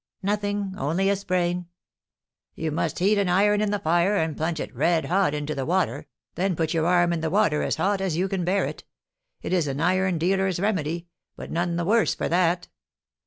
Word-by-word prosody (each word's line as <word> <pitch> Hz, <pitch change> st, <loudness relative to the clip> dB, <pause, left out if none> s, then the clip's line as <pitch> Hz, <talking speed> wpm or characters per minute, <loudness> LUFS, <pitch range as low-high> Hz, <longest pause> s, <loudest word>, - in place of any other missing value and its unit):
"Nothing, 205 Hz, -1 st, -1 dB
only 175 Hz, +8 st, +1 dB
a -, -, +2 dB
sprain." 180 Hz, -2 st, -1 dB, 0.9 s
"You 160 Hz, -1 st, -3 dB
must 155 Hz, +1 st, -2 dB
heat 200 Hz, +3 st, +3 dB
an 195 Hz, -2 st, +1 dB
iron 205 Hz, +3 st, +3 dB
in 210 Hz, -, +1 dB
the 205 Hz, -, 0 dB
fire, 175 Hz, +3 st, +2 dB
and 160 Hz, -3 st, -1 dB
plunge 160 Hz, 0 st, -2 dB
it -, -, -6 dB
red 170 Hz, -2 st, +2 dB
hot 185 Hz, -4 st, +1 dB
into 150 Hz, +1 st, -3 dB
the 135 Hz, -, -3 dB
water, 155 Hz, -2 st, -1 dB, 0.3 s
then 185 Hz, 0 st, 0 dB
put 160 Hz, 0 st, -1 dB
your 165 Hz, 0 st, +1 dB
arm 175 Hz, -1 st, +3 dB
in 165 Hz, -, -2 dB
the 160 Hz, -, -1 dB
water 160 Hz, -5 st, +2 dB
as -, -, 0 dB
hot 200 Hz, 0 st, 0 dB
as 185 Hz, -5 st, -1 dB
you 185 Hz, +2 st, +1 dB
can 190 Hz, -2 st, -2 dB
bear 190 Hz, +3 st, +1 dB
it. -, -, -6 dB, 0.6 s
It -, -, -3 dB
is 175 Hz, -5 st, +2 dB
an 135 Hz, 0 st, -3 dB
iron 185 Hz, +2 st, +1 dB
dealer's 190 Hz, +2 st, +1 dB
remedy, 170 Hz, -4 st, -1 dB, 0.3 s
but -, -, -9 dB
none 175 Hz, 0 st, -1 dB
the 170 Hz, 0 st, -1 dB
worse 220 Hz, +4 st, +2 dB
for -, -, -2 dB
that." 175 Hz, 0 st, +1 dB
175 Hz, 210 wpm, -25 LUFS, 165-195 Hz, 0.9 s, heat